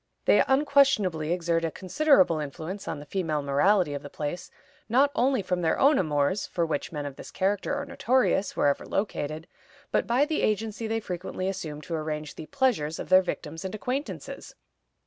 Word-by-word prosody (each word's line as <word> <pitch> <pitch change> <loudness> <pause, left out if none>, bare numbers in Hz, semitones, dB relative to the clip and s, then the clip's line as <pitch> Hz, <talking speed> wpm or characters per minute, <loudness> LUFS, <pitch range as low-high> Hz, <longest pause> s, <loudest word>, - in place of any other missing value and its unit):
They - - +5
unquestionably 265 - +3
exert 170 -1 0
a 165 - 0
considerable 185 - +3
influence 160 +7 -6
on - - -3
the 145 - -10
female 155 -3 -2
morality 145 +4 +3
of 140 - -4
the 145 - -9
place, 150 +5 -5 0.4
not 270 +5 +4
only 255 -3 +2
from 180 -1 -1
their 160 -1 +1
own 280 +1 +5
amours, 155 +3 0
for 170 - -1
which 150 -3 -3
men 150 -3 -4
of 140 -2 -7
this - - -9
character 200 +7 -1
are 285 0 -3
notorious 255 -6 +1
wherever 140 -1 +2
located, 155 -6 -3 0.5
but - - +1
by 250 +5 +3
the 310 0 -1
agency 220 +1 -1
they 225 +1 -1
frequently 185 -1 -4
assume 160 -6 -4
to 165 - -7
arrange 155 -1 -3
the 155 - -9
"pleasures" 225 - 0
of - - -7
their 185 0 +7
victims 165 -2 -5
and 190 +2 -4
acquaintances. 260 +6 -5
185 Hz, 180 wpm, -27 LUFS, 155-225 Hz, 0.5 s, their